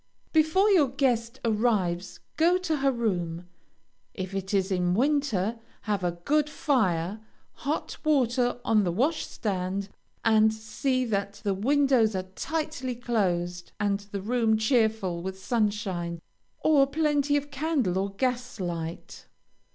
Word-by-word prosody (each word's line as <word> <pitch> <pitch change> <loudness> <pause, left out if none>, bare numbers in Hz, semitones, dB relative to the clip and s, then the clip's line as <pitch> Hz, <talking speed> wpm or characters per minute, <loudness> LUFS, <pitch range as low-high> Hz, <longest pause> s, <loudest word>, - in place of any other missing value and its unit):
Before 320 +6 +4
your 330 -8 +5
guest 250 -2 0
arrives, 210 -6 0
go 345 +3 +4
to 340 -4 -1
her 275 -1 +2
room. 180 -8 -2 0.7
If 190 0 -5
it 195 0 -3
is 195 -1 +1
in 180 -1 +1
winter, 235 -5 +1 0.2
have 205 -3 -1
a 175 -1 0
good 295 - 0
fire, 210 - 0 0.3
hot 290 +4 -3
water 250 -5 +2
on 215 -3 +4
the 175 - 0
washstand, 200 - -1 0.4
and 220 -1 +5
see 255 +4 -1
that 200 -3 -1
the 200 -2 +1
windows 250 0 +3
are 185 - -1
tightly 310 -2 -3
closed, 180 -7 -1
and 200 -1 +1
the 200 -1 -7
room 225 -1 +2
cheerful 220 -6 +1
with 190 +1 -5
sunshine, 195 -6 -1 0.4
or 285 -3 +5
plenty 290 -1 +1
of 290 0 -4
candle 270 - 0
or 195 +1 -1
gas 250 0 -2
light. 170 -2 -5
220 Hz, 130 wpm, -27 LUFS, 190-275 Hz, 0.7 s, your